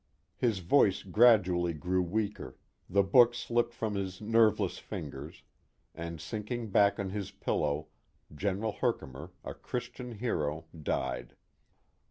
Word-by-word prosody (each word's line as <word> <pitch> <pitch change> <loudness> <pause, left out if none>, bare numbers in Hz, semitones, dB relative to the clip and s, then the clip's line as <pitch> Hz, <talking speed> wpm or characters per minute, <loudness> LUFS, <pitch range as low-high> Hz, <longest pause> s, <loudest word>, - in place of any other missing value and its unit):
His 115 -5 +1
voice 100 -3 +4
gradually 95 -5 +4
grew 90 +4 0
weaker, 105 +4 -3 0.3
the 100 +2 +4
book 120 +5 +6
slipped 120 0 0
from 110 -2 -3
his 95 -2 -3
nerveless 110 0 +2
fingers, 70 +1 -7 0.5
and 85 0 -6
sinking 110 +7 -4
back 100 +1 +4
on 95 -2 -3
his 100 -1 -4
pillow 75 +1 -1 0.5
General 100 +7 -1
Herkimer, 70 -3 -3
a - - -5
Christian 125 -1 -6
hero, 80 -9 -2
died. 65 -5 -3
100 Hz, 120 wpm, -31 LUFS, 85-110 Hz, 0.5 s, book